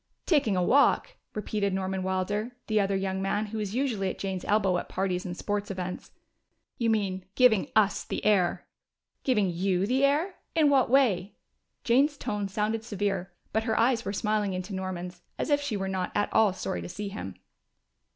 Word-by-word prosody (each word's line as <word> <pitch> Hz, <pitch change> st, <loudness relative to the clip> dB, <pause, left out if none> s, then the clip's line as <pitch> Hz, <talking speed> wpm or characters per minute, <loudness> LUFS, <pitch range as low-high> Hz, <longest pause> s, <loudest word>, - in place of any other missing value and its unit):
"Taking 270 Hz, -, +2 dB
a 180 Hz, -, +2 dB
walk!" 285 Hz, -, +3 dB, 0.2 s
repeated 205 Hz, -2 st, -1 dB
Norman 190 Hz, 0 st, -2 dB
Wilder, 205 Hz, +5 st, -2 dB
the 215 Hz, -1 st, +1 dB
other 195 Hz, -1 st, +1 dB
young 190 Hz, 0 st, -1 dB
man, 205 Hz, +2 st, 0 dB
who 215 Hz, +1 st, -5 dB
was 210 Hz, 0 st, -3 dB
usually 235 Hz, -8 st, 0 dB
at -, -, -5 dB
Jane's 190 Hz, -2 st, -3 dB
elbow 195 Hz, -4 st, +2 dB
at -, -, -8 dB
parties 185 Hz, -1 st, -1 dB
and 175 Hz, 0 st, -5 dB
sports 205 Hz, 0 st, -2 dB
affairs. 185 Hz, -2 st, -5 dB, 0.7 s
"You 230 Hz, -2 st, +2 dB
mean 195 Hz, -4 st, 0 dB
giving 245 Hz, -6 st, +4 dB
us 210 Hz, -2 st, +3 dB
the -, -, -5 dB
air!" 195 Hz, -5 st, +2 dB, 0.6 s
"Giving 210 Hz, -8 st, +2 dB
you 185 Hz, +2 st, +1 dB
the 260 Hz, +5 st, +1 dB
air? 300 Hz, +7 st, +2 dB, 0.2 s
In 305 Hz, -3 st, +4 dB
what 265 Hz, -4 st, +4 dB
way?" 225 Hz, -8 st, +3 dB, 0.5 s
Jane's 275 Hz, +5 st, +3 dB
tone 205 Hz, -5 st, -2 dB
sounded 215 Hz, +3 st, -1 dB
severe, 195 Hz, -4 st, -2 dB, 0.2 s
but 220 Hz, 0 st, +1 dB
her 220 Hz, -2 st, +1 dB
eyes 235 Hz, 0 st, +3 dB
were -, -, -3 dB
smiling 210 Hz, -1 st, 0 dB
into 185 Hz, +2 st, -5 dB
Norman's, 180 Hz, -1 st, -5 dB, 0.2 s
as -, -, -2 dB
if 290 Hz, 0 st, +3 dB
she 270 Hz, -8 st, -2 dB
were 195 Hz, 0 st, -2 dB
not 190 Hz, -1 st, -2 dB
at 205 Hz, -, 0 dB
all 220 Hz, -3 st, +5 dB
sorry 180 Hz, -, -4 dB
to 85 Hz, -, -7 dB
see 205 Hz, -1 st, -5 dB
him. 95 Hz, -, -6 dB
205 Hz, 185 wpm, -28 LUFS, 190-225 Hz, 0.7 s, all